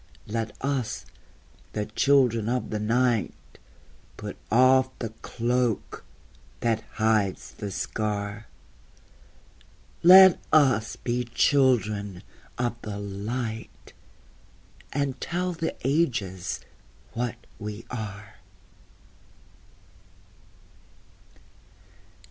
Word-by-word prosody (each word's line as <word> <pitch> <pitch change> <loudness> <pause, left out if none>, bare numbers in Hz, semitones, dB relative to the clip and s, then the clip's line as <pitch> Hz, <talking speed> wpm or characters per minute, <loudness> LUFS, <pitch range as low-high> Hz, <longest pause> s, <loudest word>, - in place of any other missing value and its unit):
Let 110 0 -3
us, 135 -4 -2 0.7
the 105 -1 -1
Children 115 -1 +3
of 125 +1 -1
the 105 - -1
Night, 115 0 +1 0.8
Put - - -6 0.2
off 130 +2 +5
the 115 - -4
cloak 120 -1 -1 0.6
that 115 -2 +1
hides 110 -3 +1
the 105 - -6
scar! 100 +2 -3 1.5
Let 190 +1 +9
us 130 -7 +4
be 125 0 -2
Children 110 -7 +2 0.3
of 120 -1 -2
the 105 -2 -5
Light, 110 +3 -5 1.0
And 140 -2 -2
tell 180 +1 -1
the 165 -1 -3
ages 120 - 0 0.5
what 120 +1 -2 0.2
we 105 +1 -6
are! 105 -3 -7
115 Hz, 80 wpm, -26 LUFS, 105-130 Hz, 1.5 s, Let